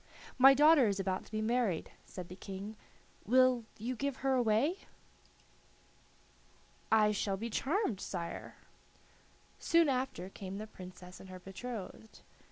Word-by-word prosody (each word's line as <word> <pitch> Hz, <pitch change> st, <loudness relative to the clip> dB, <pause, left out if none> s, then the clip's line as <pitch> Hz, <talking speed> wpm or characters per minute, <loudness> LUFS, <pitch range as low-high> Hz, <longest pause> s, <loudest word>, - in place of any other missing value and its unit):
"My 270 Hz, +1 st, +9 dB
daughter 295 Hz, -3 st, +6 dB
is 200 Hz, -1 st, -1 dB
about 190 Hz, -1 st, -2 dB
to -, -, -18 dB
be 215 Hz, 0 st, -2 dB
married," 225 Hz, -7 st, 0 dB, 0.2 s
said 180 Hz, -2 st, -8 dB
the 180 Hz, -, -9 dB
King; 195 Hz, +2 st, -7 dB, 0.5 s
"will 255 Hz, 0 st, +4 dB
you 240 Hz, +4 st, -3 dB
give 280 Hz, +2 st, -2 dB
her 270 Hz, -, +3 dB
away?" 250 Hz, -, +2 dB, 2.1 s
"I 215 Hz, -1 st, +5 dB
shall 200 Hz, -1 st, -1 dB
be 230 Hz, +3 st, -5 dB
charmed, 275 Hz, -, 0 dB
sire." 170 Hz, -3 st, -5 dB, 1.0 s
Soon 335 Hz, -2 st, +4 dB
after 255 Hz, -8 st, -2 dB
came 195 Hz, 0 st, -7 dB
the 215 Hz, -, -5 dB
Princess 180 Hz, -2 st, -11 dB
and 190 Hz, -, -12 dB
her 185 Hz, -, -8 dB
betrothed. 210 Hz, +3 st, -8 dB
220 Hz, 135 wpm, -33 LUFS, 190-255 Hz, 2.1 s, My